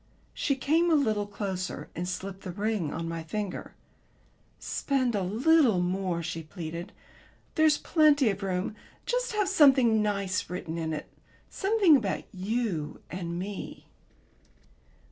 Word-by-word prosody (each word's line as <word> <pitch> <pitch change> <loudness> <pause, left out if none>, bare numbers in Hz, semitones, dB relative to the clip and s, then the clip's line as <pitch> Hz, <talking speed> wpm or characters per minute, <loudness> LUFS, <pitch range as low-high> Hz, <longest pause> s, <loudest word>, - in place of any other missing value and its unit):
She 275 - 0
came 315 +6 +2
a 325 - +5
little 215 -8 +1
closer 190 -3 -4
and 180 +1 -3
slipped 190 +1 -5
the 185 - -6
ring 205 -5 -1
on 165 +1 -4
my 165 0 -4
finger. 195 +4 -5 0.8
"Spend 260 -4 0
a 205 - 0
little 235 - +4
more," 180 -1 -1
she 165 +1 -4
pleaded. 170 +1 -7 0.6
"There's 310 -1 +4
plenty 295 -7 +4
of 195 +1 -6
room. 190 +2 -2 0.3
Just - - -1
have 415 -2 +1
something 265 - +5
nice 200 -3 -1
written 170 -2 -4
in 160 -1 -2
it 155 -1 -4 0.4
something 395 -5 +4
about 215 -8 0
you 190 -5 -2
and 170 -1 -4
me." 195 +2 -6
205 Hz, 135 wpm, -28 LUFS, 180-270 Hz, 0.8 s, a